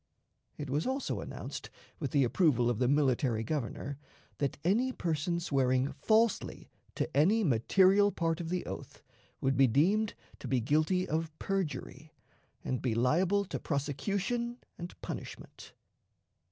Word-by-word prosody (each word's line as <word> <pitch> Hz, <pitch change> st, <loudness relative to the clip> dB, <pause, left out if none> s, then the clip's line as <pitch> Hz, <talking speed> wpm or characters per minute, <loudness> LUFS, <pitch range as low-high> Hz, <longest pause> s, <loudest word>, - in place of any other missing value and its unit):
It 145 Hz, -3 st, -5 dB
was 150 Hz, -, 0 dB
also 265 Hz, +1 st, -2 dB
announced, -, -, -7 dB, 0.3 s
with 140 Hz, -, -2 dB
the 140 Hz, +1 st, +3 dB
approval 125 Hz, -3 st, +3 dB
of 115 Hz, -, -3 dB
the 125 Hz, -, +2 dB
military 130 Hz, -5 st, +2 dB
Governor, 140 Hz, +2 st, -3 dB, 0.4 s
that 140 Hz, -2 st, -1 dB
any 230 Hz, +9 st, +2 dB
person 170 Hz, -, -1 dB
swearing 135 Hz, -3 st, +1 dB
falsely 220 Hz, +9 st, +1 dB, 0.2 s
to -, -, -1 dB
any 195 Hz, +10 st, +4 dB
material 190 Hz, -, +4 dB
part 165 Hz, -2 st, -1 dB
of 165 Hz, -, -5 dB
the 180 Hz, 0 st, -2 dB
oath -, -, -8 dB, 0.4 s
would 135 Hz, 0 st, +1 dB
be 135 Hz, +1 st, +5 dB
deemed 195 Hz, -, +2 dB, 0.2 s
to -, -, -7 dB
be 130 Hz, -, +2 dB
guilty 155 Hz, +9 st, +1 dB
of 160 Hz, 0 st, -2 dB
perjury, 155 Hz, -5 st, -4 dB, 0.5 s
and 130 Hz, -, -2 dB
be 120 Hz, -4 st, 0 dB
liable 175 Hz, -, +2 dB
to -, -, -4 dB
prosecution 200 Hz, -, -2 dB, 0.2 s
and 175 Hz, +1 st, -9 dB
punishment. -, -, -8 dB
155 Hz, 140 wpm, -31 LUFS, 135-190 Hz, 0.5 s, be